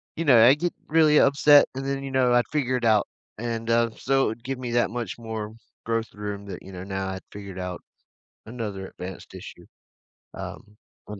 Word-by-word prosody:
you 165 - -2
know, 120 -5 +7
I 130 +3 +8
get 175 +4 -2
really 155 -1 +5
upset, 145 +1 +6
and 135 0 -4
then, 135 0 -2
you 135 - -5
know, 130 -2 +3
I'd 120 0 +3
figure 130 -4 0
it 120 - -3
out, 110 -2 +4 0.3
and, 115 0 -4
um, 115 0 +3
so 135 0 +2
it - - +1
would 115 +2 -7
give 135 0 -3
me 125 -2 -4
that 120 0 +2
much 115 -4 -4
more 110 -2 -5 0.3
growth 115 0 -2
room 105 -1 -6
that, 95 -3 -8
you 95 - -11
know, 90 0 -7
now 95 -1 -3
I 95 0 -4
figured 100 -2 -8
out 90 -1 -5 0.7
another 105 -5 -5
advanced 90 0 -9
issue, - - -11 0.7
um, 105 +1 -9 0.3
on 105 -1 -8
115 Hz, 205 wpm, -25 LUFS, 105-130 Hz, 0.7 s, I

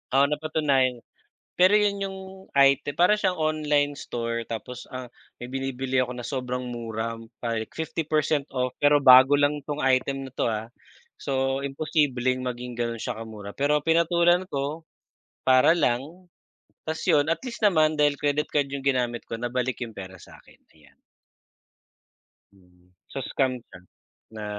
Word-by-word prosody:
Oo, 135 - +6
napatunayan. 140 -4 +1 0.6
Pero 185 +3 +6
'yon 205 -1 +1
yung 190 0 -8 0.4
item 140 +1 +4
para 180 +4 +5
siyang 185 -3 +1
online 150 -2 +1
store 115 -4 -4
tapos 120 +2 -6
ang 130 0 -6 0.3
may 125 - -7
binibili 135 -1 -2
ako 125 -1 -2
na 120 - -6
sobrang 125 -1 -3
mura 115 -2 -4 0.3
pa 115 -1 -1 0.2
50% 155 -2 -1
off 125 -1 -2
pero 145 0 +5
bago 130 +2 +8
lang 145 +1 +2
tong 145 - -3
item 135 +1 +1
na 130 - -10
to, - - 0
ah. 110 +1 -4 0.5
So, 135 0 -1
imposibleng 135 -3 0
maging 125 0 -5
gano'n 115 -1 -2
siya 125 0 -4
ka-mura. 110 -3 -8
Pero 145 +2 +2
pinatulan 170 +2 +3
ko, 145 +4 -3 0.6
para 130 +5 +5
lang 160 +5 -2 0.6
tas 160 0 -3
'yon 145 -1 +4
at 165 - 0
least 250 -3 -6
naman 155 -5 +3
dahil 145 -1 +4
credit 145 +1 0
card 145 -2 0
yung 140 -1 -4
ginamit 125 -3 0
ko - - -4
nabalik 125 +2 -2
yung 115 - -7
pera 95 -1 -8
sa - - -14
akin, - - -21 0.2
ayan. 75 -3 -23 1.6
Hmm. 90 -2 -25 0.2
So, - - -4
scam 130 -2 0
siya 95 -6 -15 0.5
na 110 -1 -7
135 Hz, 150 wpm, -25 LUFS, 120-150 Hz, 1.6 s, bago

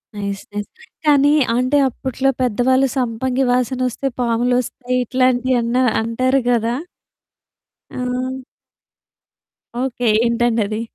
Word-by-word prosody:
Nice, 200 -1 -4
nice. 205 0 -4 0.4
కానీ 290 -1 +5 0.2
అంటే 255 +4 +2
అప్పట్లో 260 +1 -2
పెద్దవాళ్ళు 255 +3 +2
సంపంగి 250 +1 0
వాసనొస్తే 255 +1 -1
పాములొస్తాయి 245 +1 0
ఇట్లాంటియి 255 0 +2
అన్నా 240 +2 +1 0.2
అంటారు 255 +4 +1
గదా! 235 0 +1 1.2
ఆ! 255 +1 -3 1.5
ఓకే. 245 -2 -1 0.2
ఏంటండది? 230 -2 0
250 Hz, 90 wpm, -19 LUFS, 235-260 Hz, 1.5 s, కానీ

